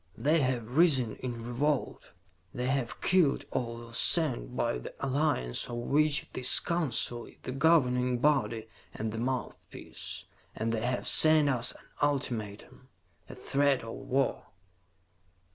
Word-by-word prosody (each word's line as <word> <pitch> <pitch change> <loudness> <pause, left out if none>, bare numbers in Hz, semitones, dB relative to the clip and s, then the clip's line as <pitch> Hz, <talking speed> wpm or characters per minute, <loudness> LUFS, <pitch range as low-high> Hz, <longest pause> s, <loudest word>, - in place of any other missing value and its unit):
They 150 +8 +2
have 125 -3 -2
risen 135 -10 +4
in 120 -3 -6
revolt, 135 +4 -2 0.5
they 125 - -2
have 130 -2 -2
killed 175 -6 +2
all 115 -1 -3
those 115 0 -5
sent 145 -7 +2
by 120 -1 -1
the - - -10
Alliance 135 - -1
of 120 - -5
which 145 +5 +1
this 130 0 +6
Council 135 -8 -2
is - - -16
the - - -5
governing 125 -4 +2
body 120 -5 0 0.3
and 110 0 -3
the 110 - -5
mouthpiece, 130 +1 -5 0.3
and 115 +1 -2
they 110 - -2
have 125 0 -2
sent 155 -2 +6
us 125 -2 +1
an - - -18 0.2
ultimatum 125 -4 -3 0.4
a - - -9
threat 140 0 0
of 115 - -7
war!" 135 +1 -2
125 Hz, 140 wpm, -29 LUFS, 120-145 Hz, 0.5 s, this